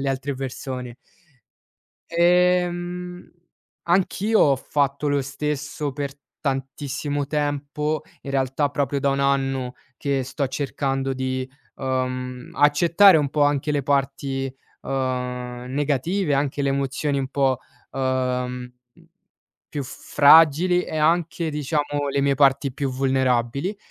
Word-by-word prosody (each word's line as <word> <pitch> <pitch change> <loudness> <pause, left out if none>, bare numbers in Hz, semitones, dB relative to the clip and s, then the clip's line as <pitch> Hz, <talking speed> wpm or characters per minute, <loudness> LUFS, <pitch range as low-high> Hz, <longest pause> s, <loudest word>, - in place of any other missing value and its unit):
le 140 - -1
altre 135 +1 -2
persone. 130 -2 -5 1.2
Ehm, 180 +1 +1 0.6
anch'io 195 +5 +2
ho 140 -2 +5
fatto 140 +1 -1
lo 140 -1 +1
stesso 145 +1 -3
per 140 0 -4 0.3
tantissimo 140 +1 -3
tempo, 150 +1 -2 0.2
in 140 - -6
realtà, 135 +2 +1
proprio 140 -1 -1
da 140 - +1
1 135 0 0
anno 135 -2 0 0.2
che 140 -2 -1
sto 135 +2 -2
cercando 135 -1 -2
di, 130 0 -2 0.3
uhm, 130 -1 -3
accettare 165 +6 +6
un 145 -3 +1
po' 150 - +1
anche 145 +1 +2
le 145 -1 0
parti, 135 -1 -1 0.3
uhm, 125 -2 -3
negative, 145 +5 0
anche 140 0 -1
le 140 - +1
emozioni 140 +1 -1
un 135 -1 -2
po', 135 -2 +1 0.3
uhm 135 - -4 0.4
mhmm, 125 0 -6 1.0
più 145 - -1
fragili 160 +6 +5
e 155 - -5
anche, 165 +1 +1
diciamo, 145 -1 -1
le 140 - 0
mie 140 -1 +2
parti 135 -1 +3
più 140 +1 -2
vulnerabili, 130 - 0
140 Hz, 120 wpm, -23 LUFS, 135-150 Hz, 1.2 s, accettare